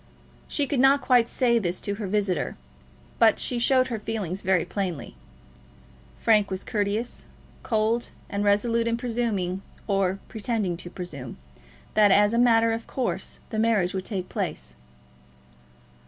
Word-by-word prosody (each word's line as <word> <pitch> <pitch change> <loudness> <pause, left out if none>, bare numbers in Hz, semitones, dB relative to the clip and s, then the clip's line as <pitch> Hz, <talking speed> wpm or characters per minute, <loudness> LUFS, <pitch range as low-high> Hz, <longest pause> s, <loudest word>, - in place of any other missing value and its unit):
She 290 - 0
could 280 -2 -1
not 270 +2 +6
quite 245 -3 +3
say 235 -2 +2
this 180 -3 -2
to 200 - -2
her 205 - -2
visitor, 200 -2 -1 0.6
but 225 -2 +5
she 245 - -2
showed 255 +1 +3
her 230 -3 -3
feeling 210 -5 -3
very 190 -2 +1
plainly. 180 -5 -4 1.0
Frank 210 -3 +3
was 190 0 -4
courteous, 210 +2 -2 0.4
cold, 225 +1 0 0.2
and 200 0 -2
resolute 230 +3 +2
in 230 0 +1
presuming, 225 -6 -2 0.2
or 195 -2 +1
pretending 215 -5 -2
to 175 - -8
presume, 150 -10 -7 0.6
that 210 -1 +5
as 205 +2 +5
a 235 - +2
matter 230 -1 +4
of 225 0 -4
course 255 -2 -3
the 220 - -1
marriage 215 -5 +2
would 190 -1 -3
take 190 -4 -3
place. 60 - -4
215 Hz, 145 wpm, -26 LUFS, 190-235 Hz, 1.0 s, not